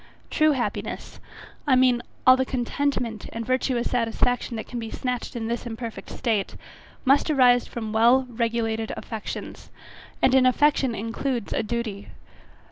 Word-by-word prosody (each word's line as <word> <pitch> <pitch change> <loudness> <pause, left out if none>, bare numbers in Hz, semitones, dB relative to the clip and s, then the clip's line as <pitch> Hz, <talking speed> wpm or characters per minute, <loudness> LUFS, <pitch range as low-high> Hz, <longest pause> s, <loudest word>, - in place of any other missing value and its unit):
True 310 -1 +4
happiness, 250 -3 -4 0.5
I 265 - +5
mean 255 -1 +4 0.2
all 255 - +9
the 260 - +1
contentment, 250 -3 -2
and 230 0 -5
virtuous 255 -1 0
satisfaction 245 0 0
that 220 - -5
can 245 - -6
be 225 -1 -5
snatched 250 +1 -4
in 230 -2 -3
this 235 +1 -3
imperfect 230 0 -6
state, 215 -4 -1 0.5
must 275 +4 +4
arise 250 -4 +4
from 220 -2 -5
well 240 +4 +5
regulated 225 -2 -1
affections; 220 -2 -7 0.5
and 260 - +3
an 260 -1 +6
affection 265 -2 +3
includes 230 +2 -3
a - - +1
duty. 220 -2 -4
240 Hz, 140 wpm, -25 LUFS, 225-255 Hz, 0.5 s, all